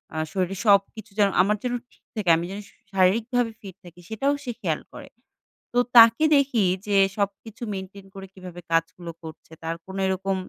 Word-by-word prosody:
আ -, -, -4 dB
শরীরে 190 Hz, -1 st, -2 dB
সবকিছু 205 Hz, +1 st, +2 dB
যেন 200 Hz, -1 st, +5 dB
আমার 205 Hz, +3 st, +2 dB
যেন 245 Hz, -1 st, -2 dB, 0.2 s
ঠিক -, -, -29 dB
থাকে। 210 Hz, -5 st, -1 dB
আমি 170 Hz, -, -3 dB
যেন 200 Hz, -, -6 dB
শু -, -, -25 dB, 0.2 s
শারীরিকভাবে 225 Hz, +6 st, +2 dB
ফিট 195 Hz, -3 st, -10 dB
থাকি, 175 Hz, 0 st, -14 dB
সেটাও 275 Hz, +6 st, 0 dB
সে 250 Hz, -, -4 dB
খেয়াল 160 Hz, -5 st, -1 dB
করে। -, -, -10 dB, 0.6 s
তো -, -, -1 dB, 0.2 s
তাকে 230 Hz, +5 st, +8 dB
দেখি 270 Hz, -6 st, +2 dB, 0.2 s
যে 205 Hz, -, +1 dB, 0.2 s
সবকিছু 205 Hz, +3 st, -4 dB
মেইনটেইন 190 Hz, +1 st, -8 dB
করে 195 Hz, 0 st, -8 dB
কীভাবে 180 Hz, -2 st, -10 dB
কাজগুলো 165 Hz, +1 st, -1 dB
করছে? 160 Hz, 0 st, -11 dB
তার 165 Hz, +1 st, -3 dB
কোনো 190 Hz, +1 st, -7 dB
এরকম 190 Hz, +1 st, -1 dB
195 Hz, 175 wpm, -24 LUFS, 185-220 Hz, 0.6 s, তাকে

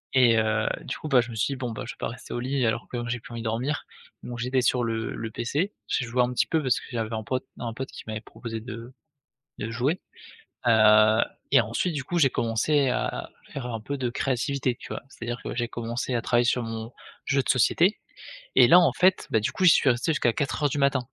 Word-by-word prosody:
et 120 Hz, -3 st, +6 dB
heu, 110 Hz, 0 st, +1 dB, 0.2 s
du -, -, -4 dB
coup, 155 Hz, -, -6 dB
bah, 135 Hz, -4 st, +6 dB
je 120 Hz, -, -7 dB
me -, -, -7 dB
suis 110 Hz, +6 st, 0 dB
dit: -, -, -4 dB
«Bon, 125 Hz, -2 st, -3 dB
bah, 110 Hz, -, -5 dB
je -, -, -4 dB
vais -, -, -23 dB
pas -, -, -2 dB
rester -, -, -9 dB
au -, -, -2 dB
lit 130 Hz, +1 st, 0 dB
alors 110 Hz, +1 st, -1 dB
que 125 Hz, -, -4 dB
j'ai 120 Hz, +1 st, -2 dB
plus 120 Hz, -, -12 dB
envie 115 Hz, -, -5 dB
de -, -, -8 dB
dormir» 125 Hz, +6 st, -1 dB, 0.4 s
donc 120 Hz, -1 st, -6 dB
j'étais 125 Hz, +2 st, +1 dB
sur 125 Hz, 0 st, +2 dB
le 115 Hz, -1 st, -2 dB
le 115 Hz, -1 st, -5 dB
PC. 145 Hz, -, -2 dB
J'ai 125 Hz, -, 0 dB
joué 120 Hz, +2 st, +1 dB
un 125 Hz, -, -1 dB
petit -, -, +1 dB
peu 160 Hz, -, +1 dB
parce 130 Hz, -4 st, +1 dB
que -, -, -12 dB
j'avais 115 Hz, -2 st, -3 dB
un 110 Hz, -, -4 dB
pote 130 Hz, +4 st, -2 dB, 0.2 s
un 115 Hz, -2 st, -4 dB
pote 130 Hz, +3 st, -5 dB
qui -, -, -9 dB
m'avait 110 Hz, -1 st, -4 dB
proposé 115 Hz, -1 st, -7 dB
de 115 Hz, +1 st, -8 dB, 0.7 s
de 110 Hz, -, -4 dB
jouer 130 Hz, +9 st, 0 dB, 0.7 s
,heu, 110 Hz, 0 st, +6 dB, 0.3 s
et -, -, +7 dB
ensuite 115 Hz, -, -1 dB
du 140 Hz, -3 st, -3 dB
coup 175 Hz, +3 st, -1 dB
j'ai 140 Hz, -4 st, +5 dB
commencé 130 Hz, +5 st, +1 dB
à -, -, 0 dB
à -, -, -5 dB, 0.2 s
faire 130 Hz, -3 st, -4 dB
un 115 Hz, -2 st, -4 dB
peu 140 Hz, +6 st, -4 dB
de 125 Hz, -2 st, -1 dB
créativité, 130 Hz, +1 st, -1 dB
tu -, -, -10 dB
vois? -, -, -5 dB
C'est-à-dire 120 Hz, -2 st, -6 dB
que -, -, -5 dB
j'ai 120 Hz, -1 st, -1 dB
commencé 120 Hz, +2 st, -3 dB
à 120 Hz, -, 0 dB
travailler 120 Hz, 0 st, +2 dB
sur 120 Hz, +1 st, +1 dB
mon 115 Hz, 0 st, -5 dB, 0.3 s
jeu 135 Hz, +1 st, +2 dB
de -, -, -6 dB
société, 170 Hz, -, +3 dB, 0.6 s
et -, -, +8 dB
là 175 Hz, -, +8 dB
en 175 Hz, -, +4 dB
fait, 185 Hz, +1 st, +3 dB
bah, 110 Hz, -, +4 dB
du 105 Hz, -, -1 dB
coup -, -, -2 dB
j'y 175 Hz, -, +9 dB
suis 140 Hz, -, +4 dB
resté 125 Hz, +6 st, +1 dB
jusqu'à 120 Hz, -6 st, +2 dB
04:00 145 Hz, +3 st, 0 dB
du 140 Hz, -, -3 dB
matin, 140 Hz, -1 st, +3 dB
120 Hz, 255 wpm, -26 LUFS, 115-135 Hz, 0.7 s, j'y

